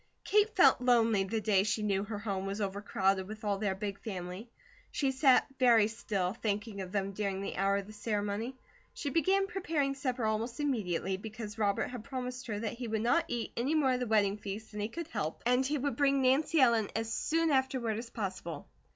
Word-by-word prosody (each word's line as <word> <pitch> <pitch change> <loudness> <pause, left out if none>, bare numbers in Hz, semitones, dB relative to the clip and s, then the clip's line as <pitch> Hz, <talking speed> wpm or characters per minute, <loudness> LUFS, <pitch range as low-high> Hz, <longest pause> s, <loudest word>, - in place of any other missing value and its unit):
Kate 420 +1 +3
felt - - +6
lonely 230 -5 +4
the 220 +3 -1
day 205 -3 +3
she 210 +2 0
knew 200 -2 +1
her 210 0 -5
home 195 -2 -3
was 200 +2 -3
overcrowded 195 -1 0
with 215 +1 -8
all 200 -2 0
their 200 -2 0
big 200 0 -4
family; 185 +1 -6 0.4
she 275 -2 0
sat 265 -1 +5
very 235 -4 +6
still 205 -5 -2
thinking 210 -2 -3
of 185 -1 -6
them 195 -1 -1
during 195 -1 -2
the 195 - -4
hour 195 +1 +2
of 200 - -4
the 215 - -11
ceremony; 210 +3 -2 0.4
she 285 - -3
began 380 +5 +3
preparing 330 -9 -1
supper 255 -3 -2
almost 225 +3 -1
immediately, 195 - -1
because 215 +1 -7
Robert 200 -2 +1
had 245 -3 -7
promised 255 0 -5
her 210 -3 -2
that 225 0 -2
he 240 0 -5
would 220 -1 -1
not 245 +8 +3
eat 235 -1 -3
any 265 +7 0
more 285 -4 +3
of 250 - 0
the 250 - -2
wedding 210 -2 +2
feast 210 +1 -7
than 210 - -6
he 210 +1 -2
could 335 +6 -6
help, 155 - -3
and 250 +2 +3
he 295 +1 0
would 280 -2 -1
bring 275 -1 +3
Nancy 285 +5 +3
Ellen 235 -5 +4
as 225 +1 -2
soon 325 0 +1
afterward 260 -5 +1
as 230 0 -7
possible. 190 -7 -5
220 Hz, 210 wpm, -32 LUFS, 200-255 Hz, 0.4 s, felt